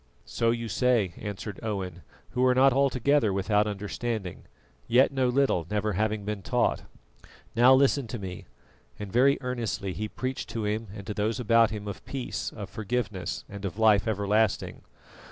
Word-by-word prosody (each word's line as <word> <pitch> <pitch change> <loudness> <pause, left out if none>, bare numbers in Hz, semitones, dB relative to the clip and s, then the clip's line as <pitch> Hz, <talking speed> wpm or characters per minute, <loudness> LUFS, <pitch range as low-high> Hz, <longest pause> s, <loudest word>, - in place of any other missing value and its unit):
"So 115 - 0
you 115 0 -1
say," 110 -3 +1
answered 105 -1 -6
Owen, 95 -5 -4 0.3
"who 125 0 0
are 125 0 +4
not 135 0 +5
altogether 135 -2 +2
without 105 +2 +1
understanding, 105 -1 -4 0.4
yet 125 +4 +4
know 130 -2 +1
little, 125 - +1
never 105 0 0
having 105 +1 -1
been 105 -1 -3
taught. - - +1 0.7
Now 125 +3 +7
listen 135 -1 +3
to 120 - -5
me," 95 -4 -7 0.5
and 105 -2 -7
very 135 +4 +5
earnestly 115 -6 -3
he 110 +3 -3
preached 130 +4 -4
to 110 -2 -3
him 110 +2 -2
and 100 -2 -8
those 105 +3 -1
about 115 -1 +4
him 105 -1 -6
of 100 - -6
peace, 135 -2 -4
of 105 -3 -7
forgiveness, 100 -3 -3
and 100 0 -9
of 100 0 -4
life 110 -2 +4
everlasting. 105 0 0
110 Hz, 160 wpm, -27 LUFS, 100-125 Hz, 0.7 s, Now